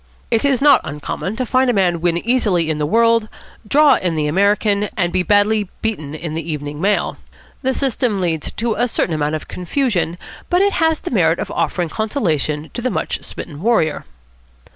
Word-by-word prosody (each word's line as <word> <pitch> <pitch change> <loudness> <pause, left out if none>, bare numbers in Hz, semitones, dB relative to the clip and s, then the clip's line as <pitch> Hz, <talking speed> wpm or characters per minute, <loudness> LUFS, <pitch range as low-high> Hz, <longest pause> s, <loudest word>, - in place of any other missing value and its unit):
It 225 -2 +2
is 275 -1 +2
not 285 -3 +6
uncommon 150 +7 -5
to 255 - -2
find 255 +2 +2
a - - +3
man 180 -5 +1
win 170 -1 +1
easily 195 -10 +2
in 150 - -3
the 150 - 0
World, 230 +3 +3 0.4
draw 295 +5 +5
in 175 -3 -1
the 155 -1 0
American, 200 +4 +2
and 175 -3 0
be 185 - +2
badly 205 +1 +2
beaten 155 -10 -3
in 155 0 -5
the 165 - -2
Evening 145 0 -5
Mail. 205 +2 +1 0.4
The 265 -1 0
system 250 -6 0
leads 165 -4 -1
to 230 0 -1
a 245 - +1
certain 185 -6 -1
amount 150 0 -1
of 155 - -6
confusion, 180 - -1 0.3
but 355 +2 +3
it 400 -1 +2
has 320 -1 +1
the 350 - -5
merit - - +3
of - - -4
offering 175 -3 -1
consolation 160 - -2
to 240 +1 -2
a - - +1
much - - -2
smitten 150 -2 -8
warrior. 205 -8 +1
200 Hz, 190 wpm, -19 LUFS, 160-240 Hz, 0.4 s, not